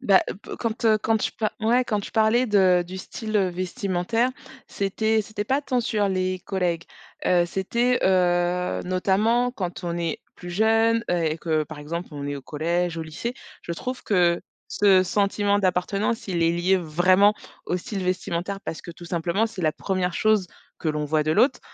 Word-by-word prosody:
Bah, 200 -7 +5
heu, - - -3
pe 200 - -9
quand, 230 0 -3
heu, 215 -1 +5
quand 220 +1 +1
tu 215 - -1
pa 215 -2 -2
ouais 240 +3 +3
quand 210 -3 -1
tu - - -8
parlais 225 +3 +3
de 190 -4 +4
du 185 +2 -7
style, 215 +3 -4
heu, 195 -3 +3
vestimentaire. 185 +5 -1 0.4
C'était 220 +3 0
c'était 205 0 -5
pas 265 +6 +1
tant 255 -3 0
sur 215 -3 0
les 185 -1 -1
collègues. 175 -4 -1 0.4
Heu, 175 -1 +3
c'était, 235 +8 0
heu, 180 - +2
notamment 210 +7 +2
quand 180 -5 -5
on 170 0 -2
est 170 -2 -2 0.2
plus 175 - -9
jeune, 225 +4 +3
heu, 175 -1 +1
et 155 0 -1
que 155 -2 0
par 150 0 -10
exemple 170 +4 -5
on 145 -2 -6
est 145 - -3
au 140 - -9
collège, 170 +4 -1
au 165 - -3
lycée, 160 +11 -5 0.3
je 170 - -4
trouve 250 +9 -5
que 175 -4 +2 0.3
ce 195 -2 +4
sentiment 200 +2 +1
d'appartenance, 195 +5 0
il 175 -3 0
est 165 - +4
lié 175 +3 +2
vraiment 185 +5 +4 0.3
au 180 - 0
style 195 +1 -5
vestimentaire 185 +1 -2
parce 160 - -5
que 170 - -9
tout 175 +1 -12
simplement 170 +5 0
c'est 220 -4 -8
la 155 - +3
1re 185 -1 -2
chose 215 -3 +2 0.3
que 160 - -2
l'on 150 -1 -1
voit 155 +1 +1
de 155 - -1
l'autre. 250 - +3
185 Hz, 195 wpm, -24 LUFS, 175-215 Hz, 0.4 s, Bah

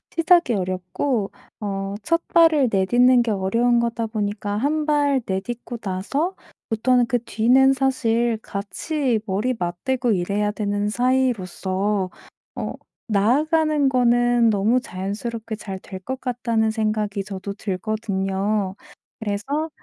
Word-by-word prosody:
시작이 340 -5 +4
어렵고 185 +4 -2 0.3
어 195 -1 -3
1 335 +7 0
발을 320 -5 +5
내딛는 245 +6 +4
게 235 -2 0
어려운 230 +5 +2
거다 235 -1 -1
보니까 205 -1 -3
한발 290 +1 +1
내딛고 235 +5 -4
나서부터는 245 - -1
그 245 +1 +1
뒤는 250 +4 +4
사실 240 -4 +1
같이 230 - -2
머리 210 +5 0
맞대고 230 +8 -1
일해야 205 +2 0
되는 205 -1 -1
사이로서 210 -5 0 0.5
어 - - -4 0.3
나아가는 290 +7 +2
거는 240 -2 +3
너무 215 +4 +2
자연스럽게 220 +3 -5
잘 195 -3 -7
될 190 0 -9
것 260 +7 -5
같다는 230 -3 0
생각이 215 -2 -1
저도 200 0 -6
들거든요 195 -1 -2 0.4
그래서 235 +9 -2
225 Hz, 255 characters per minute, -22 LUFS, 200-255 Hz, 0.5 s, 발을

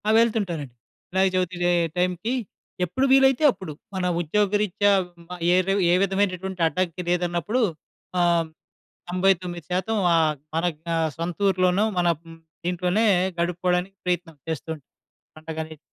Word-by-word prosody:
ఆ! - - +3
వెళ్తుంటానండి. 185 - 0 0.4
వినాయక 190 +1 +2
చవితికయే 175 -1 +1 0.2
టైంకి, 180 +6 0 0.5
ఎప్పుడు 260 +10 0
వీలైతే 270 +1 +5
అప్పుడు. 190 -7 -8 0.2
మన 185 - -2 0.2
ఉద్యోగరీత్యా 205 +3 +2 0.2
హ్మ్, 170 -1 -20
ఆహ్, 180 - -9
ఏదో 185 +1 +2 0.2
ఏ - - +5
విధమైనటువంటి 190 -2 -1
అడ్డంకి 180 +1 -2
లేదన్నప్పుడు 175 +7 0 0.6
ఆహ్, 170 -2 +3 0.6
99% 185 +2 0 0.2
ఆహ్, 160 -2 +3 0.2
మన 165 - +1
యొక్క 160 +2 -16 0.3
సొంతూర్లోనో 185 +3 +1
మన 175 - +2 0.2
హ్మ్, 165 -1 -14 0.3
ఇంట్లోనే 180 +5 +1 0.3
గడుపుకోడానికి 180 +2 0
ప్రయత్నం 175 -3 -2
చేస్తూ 160 0 -4
ఉంటాం 145 - -22 0.5
పండగ‌నేది. 160 0 -6
180 Hz, 115 wpm, -24 LUFS, 170-195 Hz, 0.6 s, వీలైతే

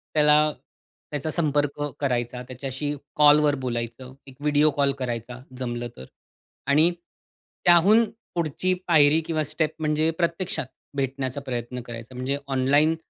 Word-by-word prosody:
त्याला 150 0 +5 0.6
त्याचा 150 +1 -3
संपर्क 145 -3 0 0.2
करायचा, 125 -3 -1
त्याच्याशी 135 +3 -4 0.2
कॉल 150 0 +7
वर 150 -1 +3
बोलायचं, 120 +1 -4
एक 135 - -12
व्हिडिओ 150 +1 +3
कॉल 140 -1 +3
करायचा 120 -1 -4 0.2
जमलं 120 -2 -3
तर 65 - -9 0.6
आणि 155 +5 +5 0.7
त्याहून 190 +7 +6 0.3
पुढची 170 +2 0
पायरी 155 -2 +5
किंवा 155 -2 -1
स्टेप 155 -1 0
म्हणजे 155 +1 +1
प्रत्यक्षात 170 -5 -1 0.3
भेटण्याचा 135 0 -2
प्रयत्न 125 -2 -4
करायचा. 120 +1 -9
म्हणजे 130 +3 -2
ऑनलाइन 140 +4 +3
145 Hz, 125 wpm, -25 LUFS, 125-155 Hz, 0.7 s, कॉल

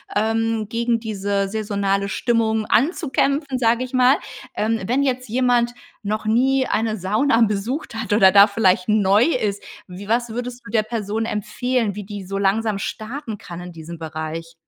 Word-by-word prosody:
ähm, 225 0 0
gegen 235 +1 0
diese 200 -3 -2
saisonale 200 -2 -1
Stimmung 220 -1 0
anzukämpfen, 280 -1 +1
sage 235 +1 +2
ich 255 - -8
mal, 255 +2 +5 0.4
ähm. 225 +1 0
Wenn 255 +4 +1
jetzt 255 -2 -1
jemand 240 0 +2 0.3
noch 215 +1 -2
nie 260 +4 +2
eine 220 0 0
Sauna 220 +6 +1
besucht 225 +5 -1
hat 225 -1 -2
oder 195 -3 +6
da 200 +1 +8
vielleicht 190 -3 +2
neu 210 0 +4
ist, 215 -10 -1 0.3
wie 185 +2 -9
was 235 +2 0
würdest 245 +2 -5
du - - -10
der 220 -2 +2
Person 220 -1 -3
empfehlen, 215 +1 -1
wie 210 - -6
die 205 -1 -7
so 195 +2 -4
langsam 205 +2 +1
starten 220 +1 -5
kann 170 0 -9
in 180 0 -8
diesem 165 +1 -9
Bereich? 160 +1 -6
220 Hz, 165 wpm, -21 LUFS, 200-240 Hz, 0.4 s, da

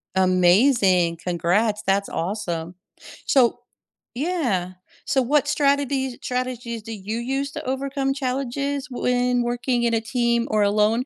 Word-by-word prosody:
Amazing, 185 -1 +4
congrats, 185 +5 0
that's 195 +1 +1
awesome. 170 -1 -3 0.5
So 245 -3 +3 0.6
yeah, 245 - -1 0.3
so 265 - +2
what 280 +3 +2
strategies 280 -3 +1
strategies 250 -2 -3
do 225 - -8
you 210 +2 -5
use 270 +3 -2
to 305 - -6
overcome 270 +1 -1
challenges 275 +1 -2
when 250 0 +1
working 240 0 -1
in 235 -1 +1
a 225 - +1
team 235 0 0
or 215 -1 +3
alone? 210 +4 +2
240 Hz, 125 wpm, -23 LUFS, 200-270 Hz, 0.6 s, Amazing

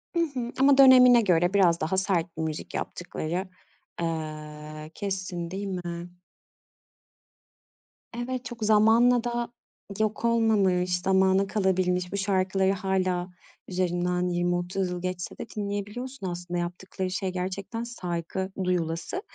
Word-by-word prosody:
I 340 - +2 0.2
hı. 240 -1 -3
Ama 275 +1 +6
dönemine 250 -3 +8
göre 175 -1 +2
biraz 175 -4 +4
daha 160 +4 0
sert 175 -4 0
bir - - -2
müzik 155 -1 -4
yaptıkları, 175 +1 -4 0.5
aaa, 155 -2 -5
kesin 185 -3 -4
değil 200 +2 -4
mi? 175 -2 -5 2.1
Evet, 255 +1 -3
çok 240 -4 -6
zamanla 225 +3 +5
da 240 -1 -2 0.5
yok 215 +1 0
olmamış, 195 -6 +2
zamana 190 +1 +3
kalabilmiş. 185 -3 0
Bu 200 - -2
şarkıları 190 -1 +1
hâlâ 185 -2 -1 0.4
üzerinden 180 -1 0
20-30 175 +2 0
yıl 180 0 -4
geçse 180 -1 -4
de - - -5
dinleyebiliyorsun 205 +3 -4
aslında. 175 0 -4
Yaptıkları 185 +2 -4
şey 190 0 -2
gerçekten 190 +5 -4
saygı 190 -4 -4
duyulası 175 - -1
185 Hz, 120 wpm, -27 LUFS, 175-210 Hz, 2.1 s, dönemine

